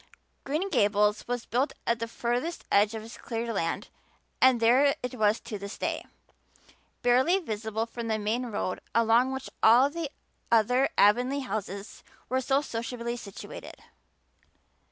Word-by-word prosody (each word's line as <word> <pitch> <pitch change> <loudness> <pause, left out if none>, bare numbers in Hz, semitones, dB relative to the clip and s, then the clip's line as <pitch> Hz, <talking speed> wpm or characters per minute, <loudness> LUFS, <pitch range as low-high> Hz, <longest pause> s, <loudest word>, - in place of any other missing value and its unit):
Green 310 +8 -1
Gables 210 - +2
was 245 -1 -3
built 260 +5 0
at 235 0 +1
the 230 - -2
furthest 245 +8 -2
edge 205 +2 +4
of 220 - -5
his 225 +2 -11
cleared 230 0 -3
land 165 -4 -2 0.5
and 260 -2 +6
there 255 +5 +4
it 250 - -3
was 215 -2 +2
to 215 -4 -6
this 200 +1 -7
day, - - -2 1.0
barely 260 +9 +4
visible 220 - -3
from 235 0 -6
the 220 -1 0
main 220 +4 -1
road 205 -4 -3 0.2
along 230 +3 +4
which 265 0 -5
all 250 +5 +6
the 330 -2 -4 0.4
other 250 +4 +4
Avonlea 250 +7 +4
houses 200 -4 -5 0.3
were 260 +1 +1
so 270 +2 +2
sociably 235 -2 -4
situated. 205 -4 -9
235 Hz, 145 wpm, -28 LUFS, 215-260 Hz, 1.0 s, and